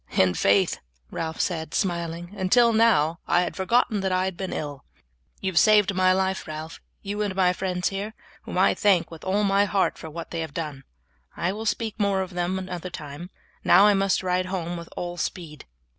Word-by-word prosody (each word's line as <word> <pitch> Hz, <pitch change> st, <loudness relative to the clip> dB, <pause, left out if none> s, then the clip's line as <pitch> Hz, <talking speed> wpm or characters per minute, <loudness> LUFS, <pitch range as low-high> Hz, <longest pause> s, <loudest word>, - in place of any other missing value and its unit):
"In 95 Hz, -1 st, +4 dB
faith," 100 Hz, +3 st, +2 dB, 0.3 s
Ralph 160 Hz, 0 st, -4 dB
said, 160 Hz, -3 st, -2 dB
smiling, 170 Hz, -1 st, -2 dB
"until 230 Hz, +5 st, +4 dB
now 195 Hz, -8 st, +3 dB
I 175 Hz, -, +3 dB
had 180 Hz, -, -3 dB
forgotten 220 Hz, +2 st, +1 dB
that 190 Hz, -1 st, -1 dB
I 185 Hz, 0 st, +1 dB
had 190 Hz, -1 st, -3 dB
been 190 Hz, +1 st, -5 dB
ill." 145 Hz, -2 st, -5 dB, 0.6 s
"You 190 Hz, -, -1 dB
have 165 Hz, -, +4 dB
saved 210 Hz, -2 st, +5 dB
my 185 Hz, 0 st, +3 dB
life, 190 Hz, 0 st, 0 dB
Ralph, 155 Hz, +1 st, -7 dB, 0.2 s
you 205 Hz, +1 st, -3 dB
and 205 Hz, -3 st, -2 dB
my 180 Hz, -1 st, +3 dB
friends 180 Hz, -1 st, -1 dB
here, 200 Hz, +3 st, -5 dB, 0.3 s
whom -, -, -6 dB
I -, -, +4 dB
thank 180 Hz, -5 st, +2 dB
with 165 Hz, -2 st, -11 dB
all 200 Hz, +3 st, +1 dB
my 200 Hz, 0 st, +3 dB
heart 200 Hz, -1 st, 0 dB
for 160 Hz, -, -8 dB
what 165 Hz, +2 st, -8 dB
they 170 Hz, -, -3 dB
have 160 Hz, -3 st, -5 dB
done. 145 Hz, -5 st, -5 dB, 0.5 s
I 175 Hz, +2 st, 0 dB
will 220 Hz, +3 st, -5 dB
speak 225 Hz, 0 st, -2 dB
more 195 Hz, -2 st, +1 dB
to 185 Hz, -, -14 dB
them 175 Hz, +1 st, -1 dB
another 185 Hz, -1 st, -5 dB
time, 155 Hz, 0 st, -8 dB, 0.3 s
now 200 Hz, -, +6 dB
I 210 Hz, -, +6 dB
must 195 Hz, -1 st, +1 dB
ride 185 Hz, 0 st, 0 dB
home 175 Hz, -2 st, -3 dB
with 170 Hz, -1 st, -8 dB
all 175 Hz, 0 st, -4 dB
speed." 160 Hz, -2 st, -5 dB
185 Hz, 205 wpm, -25 LUFS, 165-195 Hz, 0.6 s, now